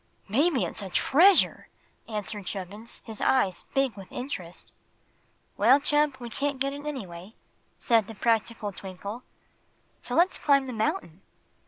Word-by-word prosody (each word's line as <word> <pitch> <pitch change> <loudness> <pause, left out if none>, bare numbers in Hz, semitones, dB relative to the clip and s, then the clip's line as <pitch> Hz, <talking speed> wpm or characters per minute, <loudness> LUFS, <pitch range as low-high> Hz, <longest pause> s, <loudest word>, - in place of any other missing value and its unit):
"Maybe 265 - +2
it's 175 - -4
a 195 - -6
treasure!" 345 - +4 0.4
answered 210 -2 -5
Chubbins, 205 +4 -7
his 220 -3 -4
eyes 195 -9 +2
big 270 -3 +2
with 195 -2 -11
interest. 195 -10 -7 0.9
"Well, 275 - +6
Chub, 295 -1 +2
we 240 -1 -7
can't 285 +3 -2
get 275 +1 0
it, 290 +1 -7
anyway," 195 -8 -7 0.4
said 225 -4 +3
the 225 - -9
practical 225 -1 0
Twinkle; 200 +4 -7 0.8
"so - - -4
let's 355 +3 +3
climb 275 -2 +3
the 255 - -5
mountain." 220 - -2
230 Hz, 140 wpm, -27 LUFS, 200-280 Hz, 0.9 s, Well